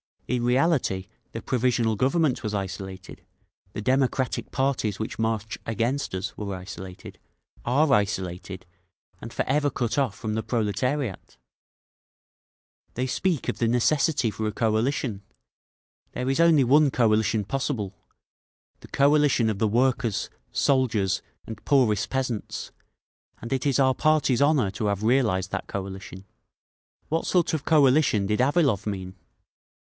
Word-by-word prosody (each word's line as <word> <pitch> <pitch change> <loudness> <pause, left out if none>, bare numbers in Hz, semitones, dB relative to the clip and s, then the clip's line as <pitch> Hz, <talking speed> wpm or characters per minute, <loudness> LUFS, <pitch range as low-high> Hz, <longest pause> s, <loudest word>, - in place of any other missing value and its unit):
_ - - 0
In 125 -1 0
reality 125 - +1 0.3
the - - -5
Provisional 120 -3 +1
Government 135 +2 +1
was 110 -3 -3
isolated; 95 -1 -6 0.5
the 105 - -4
democratic 130 +1 0
parties 130 -7 -1
which 110 - -5
march 110 -2 -2
against 115 +2 -1
us 95 +2 -4
were 100 -2 -4
isolated, 90 0 -9 0.5
are 140 +5 +2
isolated, 95 -2 -2 0.5
and - - -8
forever 145 +2 +1
cut 120 -3 -2
off 130 -8 +1
from 110 -2 -4
the 110 - -1
proletariat! 115 - -2 1.6
"They 125 - -2
speak 160 +4 -1
of - - -3
the 115 - +2
necessity 125 +1 +2
for 110 +1 -3
a 105 - -3
coalition. 110 -1 0 0.9
There 125 +1 -2
is 135 - 0
only 165 -4 +5
one 145 +4 +5
coalition 110 -3 +2
possible—the 120 -3 -7
coalition 140 -4 +3
of 105 -2 -3
the 110 - +2
workers, 120 -1 +1 0.2
soldiers 120 -8 +1 0.2
and 110 -2 -9
poorest 105 -8 +2
peasants; 130 -5 -3 0.7
and 115 - -7
it 135 +2 -1
is 140 0 +2
our 130 -1 +4
party's 150 -4 +2
honour 140 -9 +3
to 105 - -4
have 100 0 -1
realised 110 -6 +1
that - - -4
coalition…. 95 -1 -7 0.8
What 165 +1 -1
sort 175 -3 +2
of 155 -2 -2
coalition 140 -8 +4
did 105 +2 0
Avilov 135 - +2
mean? 95 -2 -5
120 Hz, 130 wpm, -25 LUFS, 105-135 Hz, 1.6 s, only